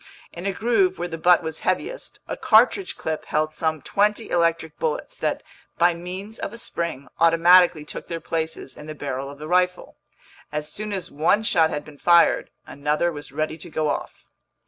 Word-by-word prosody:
In 175 Hz, +3 st, -5 dB
a -, -, +1 dB
groove 195 Hz, -3 st, +1 dB
where 175 Hz, -, -3 dB
the 165 Hz, -1 st, -6 dB
butt 175 Hz, +1 st, +5 dB
was 160 Hz, -1 st, -4 dB
heaviest, 480 Hz, -, -2 dB
a -, -, -3 dB
cartridge 250 Hz, -, +3 dB
clip 160 Hz, -1 st, -3 dB
held 155 Hz, 0 st, 0 dB
some 160 Hz, -3 st, -1 dB
twenty 210 Hz, +2 st, +1 dB
electric 165 Hz, -1 st, 0 dB
bullets -, -, -2 dB
that, -, -, -2 dB, 0.3 s
by 175 Hz, +1 st, +4 dB
means 185 Hz, +5 st, -7 dB
of -, -, -4 dB
a 230 Hz, -, -9 dB
spring, 170 Hz, -, -4 dB
automatically 170 Hz, -1 st, +5 dB
took -, -, -8 dB
their 165 Hz, -1 st, -4 dB
places 160 Hz, -5 st, -4 dB
in 150 Hz, -, -11 dB
the 155 Hz, -, -6 dB
barrel 140 Hz, -2 st, -4 dB
of 140 Hz, -, -10 dB
the 155 Hz, +1 st, -8 dB
rifle. 180 Hz, +1 st, 0 dB, 0.5 s
As 150 Hz, 0 st, -3 dB
soon 210 Hz, 0 st, -5 dB
as 190 Hz, -3 st, -4 dB
one 165 Hz, +8 st, +2 dB
shot 165 Hz, -7 st, +3 dB
had 150 Hz, -1 st, -4 dB
been 145 Hz, -2 st, -14 dB
fired, 170 Hz, -1 st, +4 dB, 0.2 s
another 150 Hz, +4 st, 0 dB
was 145 Hz, -3 st, -9 dB
ready 155 Hz, +2 st, -3 dB
to 170 Hz, -, -8 dB
go 155 Hz, -1 st, -1 dB
off. -, -, -6 dB
170 Hz, 190 wpm, -23 LUFS, 155-185 Hz, 0.5 s, butt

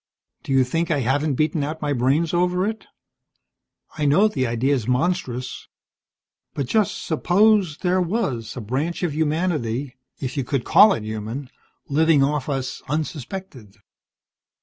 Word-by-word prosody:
"Do -, -, -7 dB
you 135 Hz, -1 st, +5 dB
think 165 Hz, +7 st, -1 dB
I 150 Hz, -4 st, +1 dB
haven't 140 Hz, +4 st, +1 dB
beaten 155 Hz, +2 st, 0 dB
out 155 Hz, +2 st, -4 dB
my 145 Hz, -1 st, 0 dB
brains 140 Hz, +7 st, +1 dB
over 180 Hz, +1 st, +1 dB
it? 220 Hz, +1 st, -4 dB, 1.1 s
I 150 Hz, -, +1 dB
know 190 Hz, +10 st, +5 dB
the 135 Hz, -, -1 dB
idea's 120 Hz, +1 st, 0 dB
monstrous. 130 Hz, -2 st, -1 dB, 0.9 s
But 140 Hz, -, -1 dB
just 210 Hz, -, 0 dB
suppose 185 Hz, 0 st, +3 dB
there 185 Hz, +1 st, +1 dB
was 145 Hz, -, -2 dB
a -, -, -4 dB
branch 140 Hz, -, -2 dB
of 170 Hz, -4 st, 0 dB
humanity 150 Hz, -5 st, -1 dB, 0.2 s
if 130 Hz, +1 st, -4 dB
you 135 Hz, -, 0 dB
could 130 Hz, 0 st, -2 dB
call 210 Hz, -1 st, +7 dB
it 110 Hz, -, -4 dB
human 110 Hz, +5 st, -5 dB, 0.4 s
living 155 Hz, 0 st, +3 dB
off 145 Hz, 0 st, -1 dB
us 135 Hz, -2 st, -3 dB
unsuspected. 150 Hz, -, -5 dB
145 Hz, 145 wpm, -22 LUFS, 130-175 Hz, 1.1 s, call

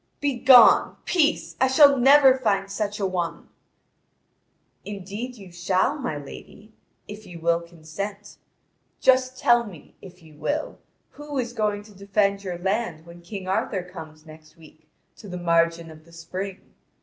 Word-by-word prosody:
"Begone! 260 Hz, -4 st, +5 dB
Peace! 320 Hz, -3 st, 0 dB
I 260 Hz, -, +5 dB
shall 280 Hz, +2 st, +6 dB
never 270 Hz, +1 st, +6 dB
find 200 Hz, -6 st, -1 dB
such 210 Hz, +1 st, -3 dB
a 200 Hz, -, -1 dB
one." 180 Hz, -3 st, -4 dB, 1.3 s
"Indeed 205 Hz, +5 st, -7 dB
you 195 Hz, -5 st, -13 dB
shall, 185 Hz, -, 0 dB
my 245 Hz, -, -4 dB
lady, 205 Hz, +9 st, -12 dB, 0.3 s
if 210 Hz, +1 st, -10 dB
you 175 Hz, -2 st, -10 dB
will 170 Hz, +1 st, +1 dB
consent. 175 Hz, +5 st, -8 dB, 0.6 s
Just 260 Hz, 0 st, +2 dB
tell 240 Hz, 0 st, +3 dB
me, 185 Hz, -10 st, -13 dB
if 180 Hz, -2 st, -14 dB
you 155 Hz, -1 st, -17 dB
will, 295 Hz, -, -4 dB, 0.3 s
who 295 Hz, -1 st, -8 dB
is 240 Hz, -2 st, -3 dB
going 210 Hz, -3 st, -2 dB
to 210 Hz, 0 st, -17 dB
defend 200 Hz, 0 st, -1 dB
your 180 Hz, -3 st, -5 dB
land 185 Hz, -3 st, -3 dB
when 170 Hz, 0 st, -14 dB
King 185 Hz, +2 st, -8 dB
Arthur 190 Hz, 0 st, -1 dB
comes 160 Hz, -3 st, -12 dB
next 155 Hz, 0 st, -16 dB
week 155 Hz, -1 st, -19 dB, 0.3 s
to 205 Hz, -, -12 dB
the 180 Hz, -, -6 dB
margin 170 Hz, -1 st, 0 dB
of 155 Hz, 0 st, -16 dB
the 170 Hz, -, -20 dB
spring? 185 Hz, +4 st, -8 dB
195 Hz, 150 wpm, -24 LUFS, 170-235 Hz, 1.3 s, shall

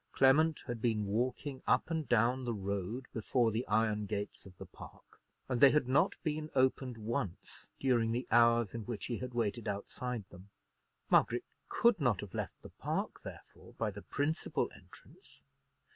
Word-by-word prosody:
Clement 150 Hz, +4 st, +4 dB
had 120 Hz, -3 st, -5 dB
been 110 Hz, -3 st, +1 dB
walking 130 Hz, +6 st, -2 dB
up -, -, +2 dB
and 160 Hz, -6 st, -2 dB
down 120 Hz, +3 st, +3 dB
the 120 Hz, -2 st, -2 dB
road 100 Hz, +5 st, -3 dB
before 115 Hz, +1 st, +1 dB
the 115 Hz, +3 st, -2 dB
iron 105 Hz, -1 st, +1 dB
gates 100 Hz, -1 st, -4 dB
of 90 Hz, -1 st, -15 dB
the -, -, -8 dB
park, -, -, -14 dB, 0.3 s
and 125 Hz, -2 st, -1 dB
they 140 Hz, -, +10 dB
had 150 Hz, -2 st, +2 dB
not 135 Hz, +3 st, +3 dB
been 155 Hz, -1 st, -2 dB
opened 130 Hz, -2 st, +1 dB
once 110 Hz, -3 st, -4 dB
during 120 Hz, -4 st, +2 dB
the 125 Hz, +2 st, -1 dB
hours 115 Hz, -2 st, +4 dB
in 115 Hz, -, -4 dB
which 110 Hz, -3 st, -4 dB
he 120 Hz, -, -3 dB
had 125 Hz, -1 st, -6 dB
waited 115 Hz, 0 st, -1 dB
outside 105 Hz, +2 st, -4 dB
them. 90 Hz, +3 st, -13 dB, 0.6 s
Margaret -, -, +3 dB, 0.2 s
could 235 Hz, -5 st, +3 dB
not 125 Hz, -10 st, +2 dB
have 105 Hz, -3 st, -9 dB
left -, -, -5 dB
the -, -, -9 dB
park, -, -, -3 dB
therefore, -, -, -12 dB
by 110 Hz, -2 st, -1 dB
the 100 Hz, +1 st, -9 dB
principal 150 Hz, -, -1 dB
entrance. 385 Hz, -, -17 dB
120 Hz, 170 wpm, -33 LUFS, 105-130 Hz, 0.6 s, they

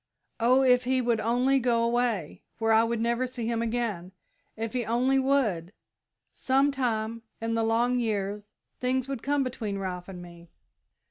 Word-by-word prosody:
Oh, 250 Hz, +3 st, +4 dB
if 250 Hz, -1 st, +4 dB
he 260 Hz, +1 st, +2 dB
would 240 Hz, -2 st, +1 dB
only 250 Hz, +5 st, +2 dB
go 235 Hz, -2 st, +1 dB
away, 235 Hz, -8 st, -1 dB, 0.2 s
where 225 Hz, 0 st, +2 dB
I 220 Hz, +1 st, +5 dB
would 230 Hz, 0 st, -1 dB
never 235 Hz, +2 st, 0 dB
see 250 Hz, -2 st, -5 dB
him 230 Hz, 0 st, -1 dB
again 225 Hz, -6 st, -2 dB, 0.4 s
if 225 Hz, 0 st, -4 dB
he 250 Hz, -1 st, -1 dB
only 250 Hz, +4 st, +2 dB
would 225 Hz, -11 st, 0 dB, 0.6 s
sometime, 250 Hz, -5 st, 0 dB, 0.2 s
in 230 Hz, 0 st, -2 dB
the 230 Hz, -, +1 dB
long 235 Hz, +3 st, +2 dB
years, 210 Hz, -2 st, -2 dB, 0.3 s
things 255 Hz, +1 st, 0 dB
would 270 Hz, -4 st, -4 dB
come 285 Hz, +1 st, +1 dB
right 255 Hz, -, -3 dB
between 210 Hz, -5 st, -4 dB
Ralph 180 Hz, -2 st, -5 dB
and 185 Hz, -2 st, -8 dB
me!" 170 Hz, -1 st, -13 dB
235 Hz, 170 wpm, -27 LUFS, 220-255 Hz, 0.6 s, I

